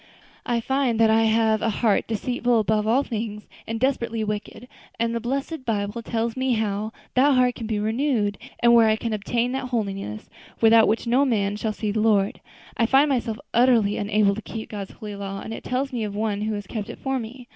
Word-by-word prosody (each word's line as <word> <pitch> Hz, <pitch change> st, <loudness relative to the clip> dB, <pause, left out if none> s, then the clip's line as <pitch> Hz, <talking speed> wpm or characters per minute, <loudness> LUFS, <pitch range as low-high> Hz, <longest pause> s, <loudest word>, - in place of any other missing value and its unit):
I 240 Hz, -2 st, +1 dB
find 265 Hz, -2 st, 0 dB
that 225 Hz, -1 st, +5 dB
I 225 Hz, 0 st, +4 dB
have 220 Hz, -1 st, +2 dB
a 225 Hz, -, +1 dB
heart 215 Hz, -1 st, +1 dB
deceitful 245 Hz, +2 st, 0 dB
above 215 Hz, 0 st, +1 dB
all 250 Hz, +5 st, +3 dB
things 215 Hz, -3 st, -5 dB, 0.2 s
and 225 Hz, 0 st, -3 dB
desperately 235 Hz, -3 st, 0 dB
wicked, 210 Hz, +3 st, -5 dB, 0.3 s
and 230 Hz, 0 st, 0 dB
the 235 Hz, -, -1 dB
blessed 275 Hz, +5 st, -3 dB
Bible 210 Hz, -1 st, -2 dB
tells 230 Hz, 0 st, -2 dB
me 260 Hz, -1 st, 0 dB
how 215 Hz, -1 st, -1 dB, 0.2 s
that 270 Hz, +2 st, +4 dB
heart 250 Hz, -1 st, +3 dB
can 230 Hz, -3 st, -6 dB
be 215 Hz, -1 st, -1 dB
renewed, 220 Hz, -1 st, 0 dB, 0.2 s
and 235 Hz, 0 st, +6 dB
where 230 Hz, -1 st, +6 dB
I 215 Hz, -, +3 dB
can 225 Hz, 0 st, -3 dB
obtain 235 Hz, +4 st, -1 dB
that 265 Hz, 0 st, -3 dB
holiness 195 Hz, -, -3 dB, 0.3 s
without 225 Hz, 0 st, +6 dB
which 220 Hz, +3 st, 0 dB
no 245 Hz, +4 st, +3 dB
man 205 Hz, -6 st, +1 dB
shall 220 Hz, +1 st, -2 dB
see 215 Hz, 0 st, -3 dB
the 215 Hz, -, -1 dB
Lord. 205 Hz, -3 st, +2 dB, 0.3 s
I 230 Hz, -, +2 dB
find 275 Hz, +4 st, +4 dB
myself 235 Hz, -5 st, -1 dB, 0.2 s
utterly 235 Hz, -4 st, +4 dB
unable 205 Hz, -1 st, +2 dB
to 215 Hz, -, -5 dB
keep 225 Hz, 0 st, -7 dB
God's 200 Hz, -2 st, -6 dB
holy 210 Hz, -1 st, -8 dB
law, 195 Hz, 0 st, -5 dB
and 225 Hz, -, -6 dB
it -, -, -7 dB
tells 265 Hz, +2 st, -2 dB
me 235 Hz, -3 st, -2 dB
of 205 Hz, -1 st, -4 dB
One 210 Hz, -1 st, -1 dB
who 215 Hz, 0 st, -1 dB
has 205 Hz, -1 st, -5 dB
kept 210 Hz, 0 st, -5 dB
it -, -, -7 dB
for 265 Hz, -1 st, -2 dB
me. 240 Hz, +2 st, -9 dB
225 Hz, 215 wpm, -24 LUFS, 210-245 Hz, 0.3 s, and